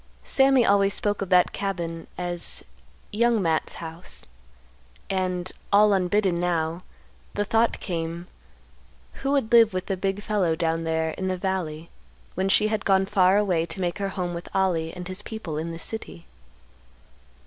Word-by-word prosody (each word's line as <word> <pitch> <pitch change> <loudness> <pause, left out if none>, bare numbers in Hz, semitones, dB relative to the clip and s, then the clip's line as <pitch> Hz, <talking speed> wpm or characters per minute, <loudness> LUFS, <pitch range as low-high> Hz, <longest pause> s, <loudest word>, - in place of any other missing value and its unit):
Sammy 270 -3 +4
always 200 0 +3
spoke 205 -1 0
of 195 - -3
that 180 -1 +5
cabin 170 -4 -4
as 175 -1 -1 0.5
"Young 235 +1 +2
Matt's 165 -4 0
house." 165 +1 -7 0.9
And, 185 -1 -1 0.2
all 210 0 +6
unbidden 190 -1 +2
now, 170 -1 -1 0.5
the 205 - 0
thought 225 +3 +2
came, 170 -1 -4 1.0
who 275 - 0
would 270 -6 +1
live 230 -4 +6
with 185 - -2
the 195 - -1
big 195 +2 -2
fellow 195 -7 +1
down 165 0 -1
there 160 0 0
in 190 - -4
the 185 0 -1
valley 175 -4 -3 0.4
when 190 +2 -1
she 210 +2 +4
had 215 -1 -1
gone 190 -1 +3
far 190 -1 +4
away 185 -6 +2
to 190 - -5
make 175 +1 -2
her 200 -1 -1
home 180 -2 -3
with 170 0 -7
Ollie 175 -4 +1
and 180 +1 -7
his 185 +2 -4
people 195 -9 -5
in 165 +1 -4
the 165 - -6
city? 165 - -7
185 Hz, 160 wpm, -25 LUFS, 170-205 Hz, 1.0 s, all